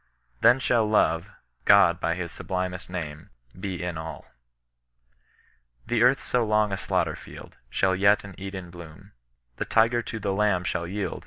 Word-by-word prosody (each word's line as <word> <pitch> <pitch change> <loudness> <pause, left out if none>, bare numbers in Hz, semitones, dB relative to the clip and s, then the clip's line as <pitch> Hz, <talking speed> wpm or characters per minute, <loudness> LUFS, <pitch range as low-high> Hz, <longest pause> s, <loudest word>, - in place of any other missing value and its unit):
Then 120 +3 +6
shall 115 -4 +2
Love 85 -3 +2 0.4
(God - - +6
by 85 0 0
his 85 -2 -5
sublimest 90 -1 -4
name) 80 -4 -6 0.2
be 95 -2 -5
all - - -2
in 85 -3 -4
all." 80 0 -7 1.6
The 120 - 0
earth 125 +3 +4
so 125 -1 +1
long 105 -1 +2
a - - 0
daoghter 95 - -1
fleld. - - -12 0.2
Shall 95 +8 +1
yet 100 +2 +4
an 100 -1 -10
Eden 95 -2 -7
bloom; 85 -3 -12 0.5
The - - -2
tiger 115 +1 +3
to 115 - -6
the 100 -2 -2
lamb 100 -3 +1
shall 85 -1 -2
yield. 95 -1 -3
95 Hz, 165 wpm, -26 LUFS, 90-105 Hz, 1.6 s, Then